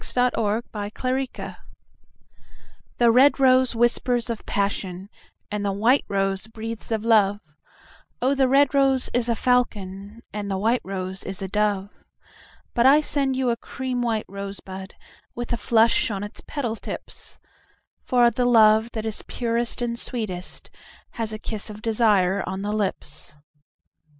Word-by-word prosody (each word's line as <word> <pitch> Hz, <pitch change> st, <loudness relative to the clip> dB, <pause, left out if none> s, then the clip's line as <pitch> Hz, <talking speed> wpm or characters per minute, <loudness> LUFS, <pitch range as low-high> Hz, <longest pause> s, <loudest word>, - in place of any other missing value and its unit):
A 250 Hz, 0 st, +1 dB
White 210 Hz, -1 st, -3 dB
Rose 260 Hz, 0 st, -2 dB, 1.4 s
THE 235 Hz, -1 st, +5 dB
red 270 Hz, +5 st, +5 dB
rose 255 Hz, -2 st, +4 dB
whispers 240 Hz, 0 st, +1 dB
of 225 Hz, -, -6 dB
passion, 195 Hz, -1 st, -2 dB, 0.4 s
And 210 Hz, 0 st, -2 dB
the 200 Hz, -, 0 dB
white 230 Hz, +8 st, +3 dB
rose 195 Hz, +1 st, -1 dB
breathes 225 Hz, +1 st, -7 dB
of 220 Hz, 0 st, -1 dB
love; 205 Hz, -3 st, +4 dB, 0.8 s
O 260 Hz, +3 st, +2 dB
the 270 Hz, -1 st, +3 dB
red 275 Hz, +2 st, +4 dB
rose 270 Hz, -2 st, +2 dB
is 245 Hz, -1 st, +2 dB
a 235 Hz, -, +2 dB
falcon, 210 Hz, -3 st, -1 dB
And 205 Hz, -1 st, -4 dB
the 195 Hz, -, -1 dB
white 225 Hz, +5 st, +1 dB
rose 190 Hz, 0 st, -5 dB
is 195 Hz, 0 st, -4 dB
a -, -, -2 dB
dove. 205 Hz, 0 st, 0 dB, 0.8 s
But 240 Hz, +2 st, +4 dB
I 285 Hz, +3 st, +7 dB
send 275 Hz, -3 st, +1 dB
you 255 Hz, -2 st, +1 dB
a -, -, 0 dB
cream 255 Hz, +1 st, -4 dB
white 225 Hz, -3 st, -1 dB
rosebud 195 Hz, -1 st, -7 dB
5 -, -, -31 dB, 0.4 s
With 240 Hz, 0 st, -4 dB
a -, -, 0 dB
flush 225 Hz, +1 st, +3 dB
on 200 Hz, -2 st, -3 dB
its 205 Hz, -, -7 dB
petal 245 Hz, -7 st, -2 dB
tips; -, -, -7 dB, 0.7 s
For 240 Hz, -1 st, +4 dB
the 250 Hz, 0 st, 0 dB
love 220 Hz, -1 st, +5 dB
that 220 Hz, -1 st, -4 dB
is 220 Hz, -1 st, -2 dB
purest 235 Hz, 0 st, -1 dB
and 235 Hz, 0 st, -2 dB
sweetest 200 Hz, -8 st, -3 dB, 0.4 s
Has 225 Hz, -2 st, -2 dB
a 215 Hz, -, -4 dB
kiss 215 Hz, 0 st, -2 dB
of 210 Hz, +1 st, -10 dB
desire 205 Hz, -5 st, +2 dB
on 190 Hz, +1 st, -4 dB
the 205 Hz, -, -2 dB
lips. 190 Hz, -7 st, -3 dB
225 Hz, 155 wpm, -24 LUFS, 200-245 Hz, 1.4 s, I